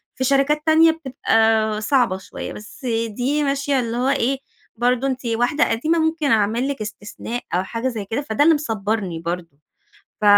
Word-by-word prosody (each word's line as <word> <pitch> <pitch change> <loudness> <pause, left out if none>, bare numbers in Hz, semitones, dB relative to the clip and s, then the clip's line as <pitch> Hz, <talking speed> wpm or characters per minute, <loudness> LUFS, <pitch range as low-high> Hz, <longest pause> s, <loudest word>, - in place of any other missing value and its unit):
في 260 - -2
شركات 275 +3 +2
تانية 320 +1 +6
بتبقى 225 -7 +1
صعبة 235 -5 +2
شوية، 190 - -7
بس 210 +6 -11 0.2
دي 265 +7 0
ماشية 275 0 +1
اللي 235 -1 -2
هو 255 +2 +1
إيه، 270 0 +1 0.4
برضو 245 +3 +1
أنتِ 260 -1 -3
واحدة 240 +6 +1
قديمة 310 +9 +1
ممكن 320 -3 +1
أعمل 225 +4 +2
لِك 275 -6 -3
استثناء 215 +3 -6
أو 180 - +2
حاجة 230 +6 -3
زي 220 -5 -3
كده، 225 +7 -2
فده 280 -1 +1
اللي 325 - +6
مصبرني 210 - -2
برضو 170 -2 -5 0.6
ف 215 - -2
245 Hz, 170 wpm, -21 LUFS, 215-280 Hz, 0.6 s, تانية